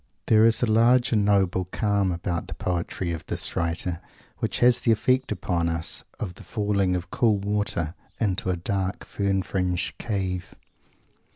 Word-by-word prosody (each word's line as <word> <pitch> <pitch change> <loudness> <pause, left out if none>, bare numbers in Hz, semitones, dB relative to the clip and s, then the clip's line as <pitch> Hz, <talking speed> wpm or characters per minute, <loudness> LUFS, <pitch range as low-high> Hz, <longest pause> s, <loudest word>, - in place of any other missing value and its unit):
There 110 0 +5
is 115 +2 +4
a - - +5
large 120 +3 +4
and 105 -3 +3
noble 95 -2 +2
calm 100 0 0
about 85 0 -3
the - - -6
poetry 90 0 -2
of 80 -2 -4
this - - -2
writer 85 +1 -1 0.4
which - - -1
has 125 0 +5
the 120 - +2
effect 125 +4 +2
upon 90 -4 0
one 85 -1 -1 0.4
of 90 -4 -4
the - - -13
falling 100 -4 0
of 90 +1 -5
cool 110 -4 +3
water 100 -5 -1 0.3
into 100 -3 0
a 90 - +1
dark, 95 +2 -2
fern 95 -1 0
fringed 90 -2 -2
cave. 95 -5 -3
95 Hz, 165 wpm, -25 LUFS, 90-110 Hz, 0.4 s, There